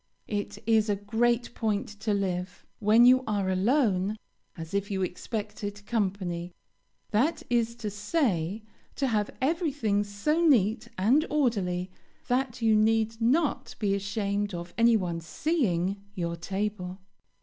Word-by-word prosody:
It 205 Hz, -1 st, -3 dB
is 220 Hz, -1 st, +3 dB
a 205 Hz, -, +2 dB
great 235 Hz, +4 st, 0 dB
point 215 Hz, -4 st, -1 dB
to 215 Hz, +1 st, -1 dB
live, 185 Hz, -2 st, -2 dB
when 220 Hz, +3 st, +6 dB
you 255 Hz, +1 st, +6 dB
are 200 Hz, -3 st, 0 dB
alone, 205 Hz, -1 st, +2 dB, 0.4 s
as 165 Hz, +1 st, -8 dB
if 200 Hz, +1 st, -1 dB
you 190 Hz, -2 st, -1 dB
expected 205 Hz, +2 st, -5 dB
company; 185 Hz, -6 st, -2 dB, 0.6 s
that 250 Hz, +10 st, +1 dB
is 235 Hz, -1 st, +1 dB
to 215 Hz, -3 st, -5 dB
say, 210 Hz, -, -1 dB, 0.3 s
to 275 Hz, -, 0 dB
have 215 Hz, -5 st, +1 dB
everything 275 Hz, -, +1 dB
so 205 Hz, +12 st, 0 dB
neat 230 Hz, -, +3 dB
and 240 Hz, +11 st, +4 dB
orderly 195 Hz, -11 st, 0 dB, 0.4 s
that 250 Hz, -1 st, 0 dB
you 220 Hz, -1 st, +5 dB
need 225 Hz, +1 st, +2 dB
not 280 Hz, +5 st, +1 dB
be 205 Hz, -3 st, 0 dB
ashamed 200 Hz, 0 st, -1 dB
of 175 Hz, 0 st, -7 dB
any 230 Hz, 0 st, +5 dB
one 170 Hz, -4 st, -3 dB
seeing 195 Hz, -, 0 dB
your 170 Hz, -3 st, -2 dB
table. 190 Hz, +1 st, -3 dB
210 Hz, 135 wpm, -28 LUFS, 190-235 Hz, 0.6 s, when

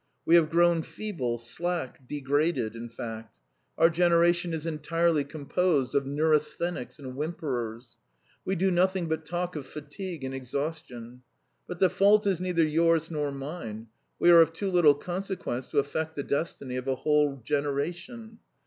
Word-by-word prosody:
We 165 Hz, -, +3 dB
have 165 Hz, -3 st, +6 dB
grown 170 Hz, 0 st, +4 dB
feeble, 160 Hz, -, -4 dB
slack 135 Hz, +2 st, -4 dB
degraded, 145 Hz, -4 st, 0 dB
in 115 Hz, +1 st, -7 dB
fact. 115 Hz, -1 st, -8 dB, 0.4 s
Our 165 Hz, +1 st, +5 dB
generation 170 Hz, 0 st, +3 dB
is 160 Hz, -1 st, -4 dB
entirely 165 Hz, 0 st, +1 dB
composed 145 Hz, 0 st, 0 dB
of 140 Hz, -1 st, +1 dB
neurasthenics 155 Hz, +1 st, 0 dB
and 130 Hz, -4 st, -8 dB
whimperers; 130 Hz, -6 st, -4 dB, 0.5 s
we 190 Hz, -, -1 dB
do 190 Hz, +2 st, +2 dB
nothing 185 Hz, 0 st, +2 dB
but 160 Hz, -1 st, -3 dB
talk 175 Hz, +1 st, -3 dB
of 140 Hz, -3 st, -6 dB
fatigue 150 Hz, +3 st, -7 dB
and 130 Hz, 0 st, -4 dB
exhaustion. 130 Hz, -2 st, -5 dB, 0.5 s
But 180 Hz, -, -6 dB
the 185 Hz, -, +5 dB
fault 205 Hz, +2 st, +4 dB
is 190 Hz, -3 st, +1 dB
neither 180 Hz, -2 st, +1 dB
yours 165 Hz, +1 st, +2 dB
nor 150 Hz, -2 st, -1 dB
mine; 135 Hz, -6 st, -7 dB, 0.3 s
we 175 Hz, -, +5 dB
are 170 Hz, -1 st, +9 dB
of 165 Hz, 0 st, +3 dB
too 195 Hz, +3 st, -3 dB
little 165 Hz, -5 st, +6 dB
consequence 175 Hz, -6 st, -4 dB
to -, -, -5 dB
affect 160 Hz, +3 st, -1 dB
the 140 Hz, -, -3 dB
destiny 140 Hz, -4 st, -3 dB
of 125 Hz, +1 st, -5 dB
a 135 Hz, -, +1 dB
whole 150 Hz, 0 st, +1 dB
generation. 175 Hz, -, -3 dB
155 Hz, 155 wpm, -28 LUFS, 135-175 Hz, 0.5 s, are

